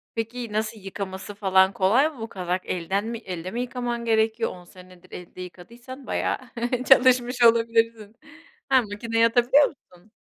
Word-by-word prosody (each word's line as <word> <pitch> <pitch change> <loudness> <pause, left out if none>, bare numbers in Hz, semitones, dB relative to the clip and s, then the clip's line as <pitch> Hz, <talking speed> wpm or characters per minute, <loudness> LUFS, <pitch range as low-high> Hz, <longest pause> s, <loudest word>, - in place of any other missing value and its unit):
Peki 230 0 -5
nasıl 215 +1 -2
yıkaması 195 0 -7
falan 190 -1 +3
kolay 230 +11 +3
mı? 295 -6 -14
Bu 225 - -5
kazak 180 -2 -3
elden 190 +4 -2
mi, 230 0 -4
elde 185 -5 -7
mi 240 - -3
yıkaman 240 -1 -4
gerekiyor? 225 0 +1
10 180 -1 -12
senedir 185 0 -17
elde 180 +1 -10
yıkadıysan 240 +9 -11
bayağı - - -1 0.5
çalışmış 250 -1 +4
olabilirsin. 230 -2 +2 0.5
Ha, 265 -2 +5
makineyi 225 +2 0
atabiliyor 245 +5 +4
musun? 185 -6 -18
225 Hz, 145 wpm, -24 LUFS, 190-240 Hz, 0.5 s, Ha